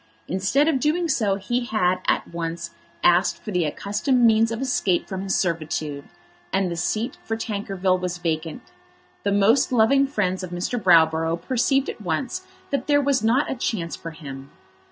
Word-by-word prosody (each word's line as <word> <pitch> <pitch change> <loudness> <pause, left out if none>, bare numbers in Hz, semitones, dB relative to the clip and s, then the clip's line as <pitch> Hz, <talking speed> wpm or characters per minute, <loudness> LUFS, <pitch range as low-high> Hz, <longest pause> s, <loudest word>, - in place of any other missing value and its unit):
Instead 195 - +1
of 300 -5 +2
doing 320 +5 +1
so 215 -9 +1
he 240 +5 -2
had 185 -7 +1
at - - +1
once 170 0 -5 0.3
asked 175 +2 +4
for 215 - -7
the 180 -3 +1
accustomed 215 - +1
means 225 0 +4
of 230 - -3
escape 245 -9 0
from 190 -1 -4
his 195 0 -1
servitude, 155 -4 -2 0.5
and 190 -2 0
the - - -2
seat 215 +8 -2
for 225 - -3
Tankerville 195 -4 -1
was 180 -1 -3
vacant. 160 -2 -3 0.6
The 200 - 0
most 210 +8 +3
loving 260 +4 +4
friends 190 -8 -1
of 185 - -6
Mr. 180 +7 -3
Browborough 165 -2 +4
perceived 260 +7 +1
at - - -6
once 230 - -3 0.2
that 275 -3 -1
there 290 -1 +4
was 275 -4 +1
not 240 +6 +2
a - - +1
chance 180 -10 -2
for 165 - -8
him. 140 -4 -9
195 Hz, 175 wpm, -23 LUFS, 170-245 Hz, 0.6 s, asked